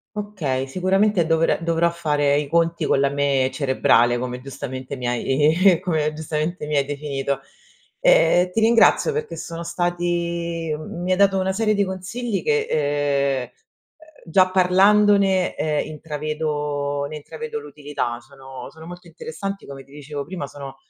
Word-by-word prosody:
Okay, 165 -11 -3
sicuramente 185 +4 +2
dovrà 165 0 +2
dovrò 170 0 +1
fare 145 -4 +1
i 145 -1 -1
conti 165 0 +1
con 135 - +2
la 140 0 +3
me 140 -2 +1
cerebrale, 120 -3 +2
come 125 0 -4
giustamente 130 0 -6
mi 125 -2 -4
hai 150 +9 +3
come 155 -5 0
giustamente 155 +1 -3
mi 150 - -1
hai 140 - +2
definito. 140 -1 -3 0.6
E - - +4
ti 225 - +1
ringrazio 230 - +4
perché 455 0 -4
sono 170 0 -6
stati 170 -1 -2
m 155 +2 -8
mi 180 - -3
hai - - 0
dato 195 -1 +4
una 190 0 0
serie 215 +2 +1
di 200 - +2
consigli 195 +4 -4
che, 450 -1 +1 0.7
ehm, 125 - -8 0.8
già 185 +2 +3
parlandone, 195 +1 +4
ehm, 150 -1 -1
intravedo 150 -2 -3
ne - - -7
intravedo 450 - -6
l'utilità, 145 - -5
sono 135 +1 -11
sono 160 0 -13
molto 175 +1 -10
interessanti, 175 +4 -6
come 135 -1 -9
ti 135 - -23
dicevo 145 0 -6
prima, 175 -2 -5
sono, 140 -1 -9
160 Hz, 150 wpm, -22 LUFS, 140-185 Hz, 0.8 s, E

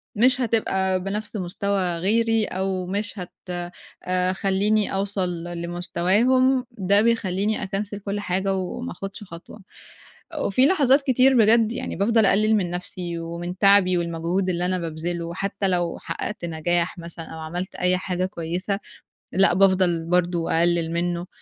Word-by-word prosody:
مش 255 +4 +3
هتبقى 190 -5 +1
بنفْس 210 +3 -4
مستوى 185 -1 -1
غيري، 225 +4 +2
أو 190 -1 -2
مش 205 +2 -3
هت 180 - -7 0.7
آآ 185 0 +1
خلّيني 200 +2 +1
أوصل 195 -1 -1
ل 175 -1 -6
لمستواهم، 210 +10 +2
ده 200 -2 +2
بيخلّيني 215 -2 0
أكنسل 200 +1 -3
كلّ 200 0 -4
حاجة 195 0 -1
وما 190 +7 -4
آخُدش 195 +1 -7
خطوة، 180 +4 -11 0.8
وفي 255 +7 +3
لحظات 280 -4 +4
كتير 260 -1 +4
بجد 225 0 +5
يعني - - -4
بافضل 220 +3 +3
أقلل 215 +3 +3
من 185 -4 0
نفْسي، 175 -1 -5
ومن 170 +2 -5
تعبي 195 -2 +5
والمجهود 170 +3 -1
اللي 175 0 -1
أنا 185 0 0
بابذله، 170 +1 -4
حتّى 195 +1 -2
لو 175 -2 0
حققت 210 -4 -5
نجاح 170 +2 -1
مثلًا 170 0 -7
أو 160 - -9
عملت 175 +4 -5
أي 180 0 +1
حاجة 185 0 -2
كويسة، 185 +3 -3 0.5
لأ 190 -1 +4
بافضل 185 -3 +3
برضه 175 -1 +1
أقلل 170 -1 +1
منه، 175 +1 -1
190 Hz, 145 wpm, -23 LUFS, 175-210 Hz, 0.8 s, بجد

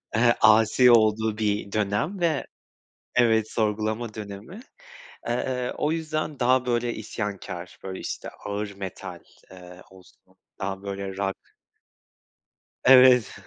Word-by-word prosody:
eee, 120 +1 +4
asi 110 +3 +6
olduğu 110 -1 +3
bir 105 -2 -1
dönem, 110 - -1
ve 165 -4 0 0.7
Evet, 110 -3 +3
sorgulama 110 +1 -1
dönemi. 105 - -9 0.7
Eee, 125 +1 -2
o 150 - 0
yüzden, 155 -2 -3
daha 125 0 +3
böyle 120 -1 0
isyankâr, 100 -5 -6
böyle, 95 -1 -6
işte - - -6 0.2
ağır 105 0 -3
metal, 95 -2 -7 0.3
eee, 90 0 -13
olsun 95 0 -21 0.2
daha 95 0 -4
böyle 100 -1 -5
Rock. 95 -1 -1 1.5
Evet, 125 -3 +6
110 Hz, 110 wpm, -25 LUFS, 100-125 Hz, 1.5 s, asi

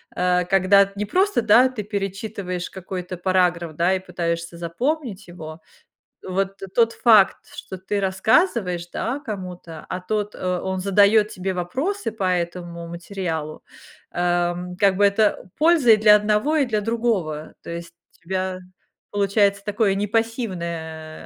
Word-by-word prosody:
Э, 180 0 +1
когда 195 +1 +4
не 210 - -2
просто, 375 - +2
да, 235 +4 +5
ты 240 -5 -5
перечитываешь 195 -2 -4
какой-то 185 -1 -6
параграф, 175 -3 +1
да, 175 +4 +2
и - - -2
пытаешься 170 -2 -4
запомнить 215 - -3
его, 160 -2 -9 0.6
вот 195 +1 -2 0.2
тот 230 -1 +3
факт, 215 -5 +5 0.2
что 190 - -8
ты 200 +2 -3
рассказываешь, 190 - +1
да, 255 +5 -2
кому-то, 180 - -7
а 185 - -3
тот, 210 +2 -2
э, 180 -1 -2
он 190 0 -3
задаёт 205 +2 +4
тебе 190 -1 -3
вопросы 250 - -2
по 210 -3 -5
этому 170 -1 -2
материалу, 170 -3 -5 0.5
эм, 175 0 -1
как 195 -1 +3
бы, 205 - +5
это 200 -2 +1
польза 310 -7 +5
и 215 - +7
для 210 0 +7
одного 210 +9 +2
и 280 - +3
для 215 -3 -1
другого. 205 -9 -2
То - - -7
есть 170 0 -7 0.3
у - - -34
тебя 185 -1 -2 0.5
получается 200 0 +1
такое 210 -1 +1
не 205 +1 -1
пассивное, 170 -9 -3
190 Hz, 145 wpm, -22 LUFS, 175-215 Hz, 0.6 s, и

